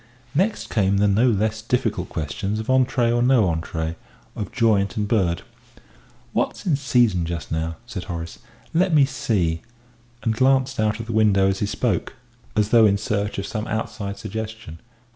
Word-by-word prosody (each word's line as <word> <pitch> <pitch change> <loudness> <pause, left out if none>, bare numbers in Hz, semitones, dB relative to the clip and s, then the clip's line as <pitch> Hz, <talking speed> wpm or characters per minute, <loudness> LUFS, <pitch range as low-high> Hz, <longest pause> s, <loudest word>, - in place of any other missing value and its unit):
Next 195 +8 0
came 100 -2 +2
the 105 +1 +3
no 105 +5 +3
less 110 0 0
difficult 110 -6 -1
questions 95 +7 -3
of 110 - -4
entrée 125 -2 +3
or 120 - +2
no 125 -2 +4
entrée, 80 0 -3 0.4
of 105 - -5
joint 110 -5 +2
and 105 -1 0
bird. 90 -6 +1 0.9
"What's - - -1
in 170 -6 +3
season 120 -9 +2
just 85 -1 -5
now?" 80 +1 -2
said 105 -7 -6
Horace; 85 -2 -6 0.3
"let 175 0 +3
me 145 -2 +6
see" 95 -11 -1 0.6
and 115 - +1
glanced 130 +1 +2
out 110 0 +1
of 115 - -5
the 115 - -4
window 100 -3 +4
as 95 0 -1
he 105 - 0
spoke, 115 +5 -1 0.4
as 105 -1 +2
though 115 -2 +6
in 100 0 +2
search 105 -2 -2
of 100 - -3
some 110 +1 -4
outside 100 -2 -3
suggestion.... 110 -5 -6
110 Hz, 170 wpm, -23 LUFS, 95-120 Hz, 0.9 s, me